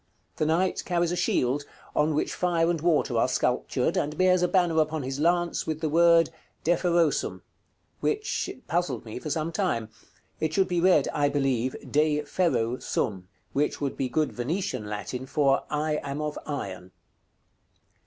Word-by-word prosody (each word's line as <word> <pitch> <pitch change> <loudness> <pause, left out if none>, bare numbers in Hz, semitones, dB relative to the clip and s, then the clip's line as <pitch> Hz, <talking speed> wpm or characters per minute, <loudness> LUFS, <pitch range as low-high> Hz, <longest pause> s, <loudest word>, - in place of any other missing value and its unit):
The 155 - +1
knight 180 +4 +1
carries 175 -1 0
a - - 0
shield, 135 -4 +1 0.3
on 150 0 +2
which 155 - 0
fire 170 -2 +1
and 165 -3 -2
water 150 -8 +2
are - - +3
sculptured, 125 0 0
and 150 +1 -1
bears 185 -1 +4
a 180 - +3
banner 175 -4 +3
upon 155 -1 -1
his 135 +2 -4
lance, 175 +2 +1
with 155 -1 -2
the 160 -1 -1
word 165 +1 +5 0.3
"DEFEROSUM," 170 -1 +1 0.6
which 425 -1 -1 0.2
puzzled 160 -9 -1
me 110 +2 -6
for 155 - -6
some 155 +2 -1
time. 115 -8 -1 0.5
It 155 0 -1
should 190 -1 +3
be 175 -2 0
read, 175 -6 +4
I 145 -1 +2
believe, 130 -3 0 0.2
"De 150 0 +2
ferro 145 -7 0
sum;" 95 -4 -2 0.3
which 145 +2 0
would 140 -2 -2
be 130 -2 -2
good 155 +4 0
Venetian 155 - -3
Latin 125 +5 -5
for 140 -1 +2
"I 150 0 0
am 140 +1 -4
of 150 -1 -3
iron." 95 -11 -5
150 Hz, 165 wpm, -27 LUFS, 135-170 Hz, 0.6 s, word